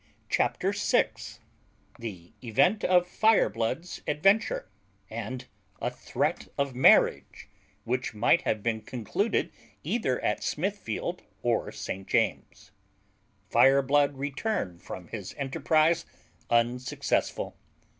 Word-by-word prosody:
CHAPTER -, -, +1 dB
SIX -, -, 0 dB, 0.6 s
THE 95 Hz, -7 st, -8 dB
EVENT 155 Hz, -, +2 dB
OF 180 Hz, -1 st, +4 dB
FIREBLOOD'S 165 Hz, -, +1 dB
ADVENTURE; 195 Hz, +9 st, +2 dB, 0.4 s
AND 115 Hz, +3 st, -5 dB, 0.3 s
A -, -, -2 dB
THREAT -, -, -2 dB
OF 140 Hz, -1 st, 0 dB
MARRIAGE, 125 Hz, -4 st, +4 dB, 0.4 s
WHICH 125 Hz, -1 st, -2 dB
MIGHT 120 Hz, +10 st, +4 dB
HAVE 110 Hz, -2 st, -1 dB
BEEN 115 Hz, -1 st, -1 dB
CONCLUDED 130 Hz, -, -1 dB, 0.3 s
EITHER 135 Hz, -, 0 dB
AT 105 Hz, -, 0 dB
SMITHFIELD 185 Hz, -, -3 dB, 0.2 s
OR -, -, 0 dB
ST. 95 Hz, +1 st, -6 dB
JAMES'S. 110 Hz, -3 st, -1 dB, 0.8 s
Fireblood 140 Hz, +3 st, +4 dB
returned 140 Hz, -, -3 dB
from 90 Hz, -2 st, -8 dB
his 100 Hz, -5 st, -7 dB
enterprise 155 Hz, +4 st, +2 dB, 0.4 s
unsuccessful. 120 Hz, +2 st, 0 dB
130 Hz, 95 wpm, -28 LUFS, 115-165 Hz, 0.8 s, OF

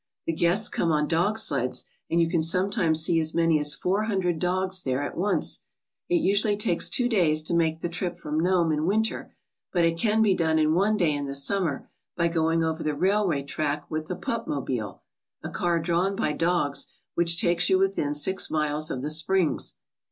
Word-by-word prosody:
The 165 Hz, -, -1 dB
guests 175 Hz, +6 st, +2 dB
come 165 Hz, -, -1 dB
on 150 Hz, -1 st, +1 dB
dog 175 Hz, +7 st, +1 dB
sleds 135 Hz, -, 0 dB, 0.2 s
and 170 Hz, -, +1 dB
you 165 Hz, -, +3 dB
can 165 Hz, -1 st, 0 dB
sometimes 170 Hz, -1 st, +1 dB
see 165 Hz, -1 st, +2 dB
as 160 Hz, 0 st, 0 dB
many 165 Hz, -2 st, +3 dB
as 150 Hz, 0 st, +2 dB
four 195 Hz, +8 st, -1 dB
hundred 185 Hz, -6 st, -1 dB
dogs 185 Hz, +1 st, 0 dB
there 130 Hz, -1 st, -1 dB
at -, -, -5 dB
once. 200 Hz, +4 st, 0 dB, 0.5 s
It 355 Hz, -, +2 dB
usually 205 Hz, -, +2 dB
takes 180 Hz, -5 st, +1 dB
two 245 Hz, -, +1 dB
days 165 Hz, -9 st, +2 dB
to 155 Hz, -, -1 dB
make 165 Hz, -1 st, +1 dB
the -, -, -1 dB
trip 175 Hz, +1 st, -4 dB
from 150 Hz, +1 st, -3 dB
Nome 175 Hz, -1 st, +2 dB
in 155 Hz, +1 st, -1 dB
winter, 220 Hz, +3 st, -1 dB, 0.4 s
but 175 Hz, -2 st, +2 dB
it 165 Hz, 0 st, 0 dB
can 220 Hz, +1 st, +2 dB
be 205 Hz, -3 st, +3 dB
done 160 Hz, -3 st, +1 dB
in 155 Hz, 0 st, +2 dB
one 205 Hz, +5 st, +2 dB
day 170 Hz, -6 st, +2 dB
in 145 Hz, -1 st, -3 dB
the 140 Hz, -, -5 dB
summer 155 Hz, +1 st, -1 dB, 0.3 s
by 170 Hz, -1 st, +2 dB
going 165 Hz, 0 st, +1 dB
over 160 Hz, 0 st, -2 dB
the 150 Hz, -1 st, -2 dB
railway 185 Hz, -4 st, +1 dB
track 145 Hz, 0 st, -3 dB
with 155 Hz, 0 st, -3 dB
the 180 Hz, -, -4 dB
Pup 230 Hz, +5 st, -4 dB
mobile, 125 Hz, -8 st, -4 dB, 0.4 s
a -, -, -5 dB
car 170 Hz, -1 st, 0 dB
drawn 175 Hz, +4 st, 0 dB
by 205 Hz, -7 st, 0 dB
dogs, 165 Hz, -2 st, 0 dB, 0.3 s
which 170 Hz, 0 st, +2 dB
takes 175 Hz, -3 st, +2 dB
you 190 Hz, -, +4 dB
within 190 Hz, -7 st, 0 dB
six 190 Hz, +6 st, 0 dB
miles 150 Hz, 0 st, -1 dB
of 130 Hz, -3 st, -4 dB
the 150 Hz, -, -2 dB
springs." 165 Hz, +2 st, 0 dB
170 Hz, 205 wpm, -26 LUFS, 155-190 Hz, 0.5 s, you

